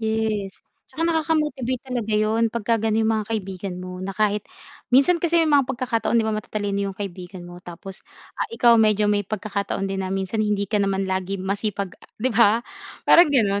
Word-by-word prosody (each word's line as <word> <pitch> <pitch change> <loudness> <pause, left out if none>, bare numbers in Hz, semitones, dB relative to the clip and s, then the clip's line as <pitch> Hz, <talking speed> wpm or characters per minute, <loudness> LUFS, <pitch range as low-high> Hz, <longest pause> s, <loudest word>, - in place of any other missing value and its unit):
Yes, 220 -3 -1 0.3
tsaka 330 - -3
nakaka 325 -1 +1
motivate 260 -5 -2
talaga 245 -4 -3
'yun 220 +2 +2
pagka 230 0 0
gano'n 220 0 +1
'yung 220 - +2
mga 210 - -6
kaibigan 190 -2 -6
mo, 180 0 -7
na 190 0 -5
kahit 210 -1 +1 0.5
minsan 280 +7 +4
kasi 340 0 +1
may 315 - 0
mga 280 -3 +4
pagkakataon 235 -2 0
'di 230 - +3
ba, 220 - 0
matatalino 205 -1 -2
'yung 195 - -8
kaibigan 185 -2 -7
mo 175 0 -11
tapos 180 +2 -9 0.4
ah, - - -1
ikaw 240 - +4
medyo 210 -1 +3
may 205 - +2
pagkakataon 200 -2 -3
din 195 0 -2
na 190 - -3
minsan 195 +3 -2
hindi 210 -1 +1
ka 205 +1 0
naman 195 -1 0
lagi 190 +1 -2
masipag 200 0 -3 0.2
'di 255 +2 -1
ba, 230 +1 +4 0.4
parang 345 -1 +7
gano'n. 205 -8 +2
215 Hz, 190 wpm, -23 LUFS, 195-235 Hz, 0.5 s, parang